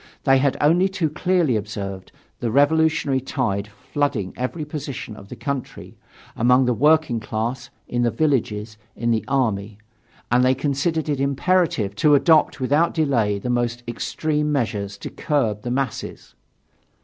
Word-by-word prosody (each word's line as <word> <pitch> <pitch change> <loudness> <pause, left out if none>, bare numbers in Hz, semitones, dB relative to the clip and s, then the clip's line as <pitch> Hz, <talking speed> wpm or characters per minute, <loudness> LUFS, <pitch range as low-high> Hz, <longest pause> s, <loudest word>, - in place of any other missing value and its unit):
They 135 -1 +4
had 140 0 +1
only 175 +6 +3
too 175 -5 -1
clearly 175 -5 +1
observed 100 -3 -5 0.3
the 120 - -1
revolutionary 145 0 +2
tide 110 -6 -2
flooding 105 0 -3
every 140 +5 -3
portion 140 -7 -6
of 100 -2 -13
the - - -7
country, 140 -4 -5 0.4
among 125 +3 +4
the 125 - +2
working 150 -1 +3
class, 120 +4 -3 0.2
in 120 - -1
the 120 - +3
villages, 110 -5 -1 0.2
in 120 0 -1
the 110 -1 +1
army; 110 -7 -1 0.5
and 125 +1 +4
they 130 +1 +4
considered 145 +4 -1
it 145 -3 -1
imperative 140 - +1
to 150 +6 +5
adopt 155 -2 +4
without 145 +6 +1
any 160 - +3
delay 105 -6 +1
the 125 +5 -3
most 120 0 -1
extreme 150 +5 -1
measures 105 -7 -2
to - - -7
curb 115 -9 -1
the 120 - -5
masses. 130 0 -4
130 Hz, 150 wpm, -22 LUFS, 110-150 Hz, 0.5 s, to